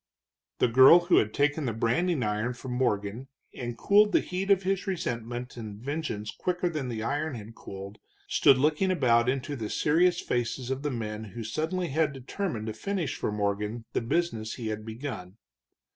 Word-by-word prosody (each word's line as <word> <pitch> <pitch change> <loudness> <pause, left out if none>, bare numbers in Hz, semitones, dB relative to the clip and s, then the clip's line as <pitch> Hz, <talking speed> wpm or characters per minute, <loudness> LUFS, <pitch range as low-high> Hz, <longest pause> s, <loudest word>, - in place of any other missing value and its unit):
The - - +3
girl 130 +8 +8
who 175 +1 +3
had 110 - +3
taken 145 +3 +1
the 115 - -1
branding 130 +7 +1
iron 110 +4 -1
from 130 +1 -7
Morgan 120 -1 -1 0.3
and 120 -2 -5
cooled 205 +1 +4
the - - +6
heat 185 +2 -3
of 195 -1 +4
his 195 +1 -1
resentment 120 -8 -3
and 105 -3 -7
vengeance 130 -5 -4
quicker 180 0 -1
than 150 -6 -3
the 110 -2 -3
iron 145 +3 -1
had 110 0 -9
cooled, 100 -1 -9 0.3
stood 135 - +5
looking 150 +7 +2
about 125 -8 +3
into 135 +2 -2
the 110 -5 -4
serious 175 +3 +3
faces 120 +1 -2
of 135 +1 -2
the 150 - -1
men 110 -4 -4
who 110 +3 -7
suddenly 165 +10 -2
had 150 +1 +1
determined 135 - -4
to 110 - -3
finish 175 - -2
for - - -2
Morgan 105 +2 -2
the - - +1
business 115 -4 -1
he 115 -3 -4
had 110 0 -5
begun. 110 -5 -6
125 Hz, 180 wpm, -28 LUFS, 110-160 Hz, 0.3 s, girl